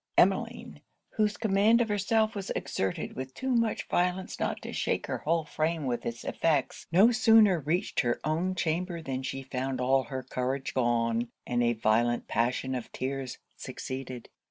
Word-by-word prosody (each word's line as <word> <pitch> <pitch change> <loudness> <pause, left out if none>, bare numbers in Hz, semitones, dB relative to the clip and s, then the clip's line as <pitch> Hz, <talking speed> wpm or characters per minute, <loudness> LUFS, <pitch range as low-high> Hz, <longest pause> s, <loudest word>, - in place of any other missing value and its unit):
Emmeline, - - +1 0.3
whose 210 -1 0
command 215 +2 +4
of 240 - +2
herself 215 +2 +1
was 200 -2 -5
exerted 95 -1 -2
with 130 0 -6
too 265 0 -2
much 230 -3 +1
violence 180 +1 0
not - - -1
to - - -7
shake - - -1
her - - -3
whole 165 0 0
frame 155 0 -1
with 120 -2 -2
it's 115 0 -5
effects, 160 -3 0
no 195 +8 +6
sooner 220 -5 +5
reached 165 +7 -1
her 120 -2 +1
own 170 +5 0
chamber 170 +1 -1
than 135 -4 -4
she 135 0 -4
found 130 0 -3
all 130 +1 +2
her 130 -2 -5
courage 130 +1 -3
gone, 120 -1 +1 0.2
and 120 0 0
a 120 0 +3
violent 115 +2 +1
passion 125 +2 0
of 125 -3 -5
tears 130 0 -4 0.2
succeeded. 130 -2 -6
140 Hz, 165 wpm, -29 LUFS, 125-190 Hz, 0.3 s, no